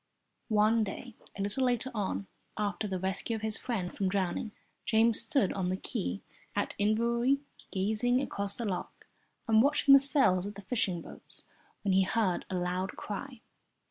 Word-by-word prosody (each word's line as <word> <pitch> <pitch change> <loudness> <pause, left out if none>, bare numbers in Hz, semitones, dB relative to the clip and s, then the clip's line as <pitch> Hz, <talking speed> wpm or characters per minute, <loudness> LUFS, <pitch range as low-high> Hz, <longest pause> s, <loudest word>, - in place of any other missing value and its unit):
One 215 +1 +4
day 220 +4 -6 0.2
a 195 - -1
little 205 +6 -1
later 250 +1 +1
on, 200 -2 -2 0.3
after 210 0 -1
the 190 -2 -2
rescue 190 +5 -1
of 220 - -6
his 220 0 +3
friend 200 -8 -3
from 195 -2 0
drowning, 195 +2 -1 0.3
James 225 0 +4
stood 230 -3 +1
on 185 -2 -1
the 185 - -1
quay 90 - -3 0.3
at - - -1
Inverary 235 +5 +2 0.3
gazing 220 +6 +1
across 200 -7 -2
the 235 - -3
loch 185 -4 -4 0.4
and 220 -1 +5
watching 280 +1 +5
the 275 - +10
sails 265 - +2
of 205 - -7
the 200 - -10
fishing 185 -6 -1
boats, - - -12 0.4
when 195 -2 +2
he 190 - +5
heard 190 -1 0
a 190 - -3
loud 180 +1 -1
cry. 240 +4 -6
210 Hz, 170 wpm, -31 LUFS, 190-235 Hz, 0.4 s, the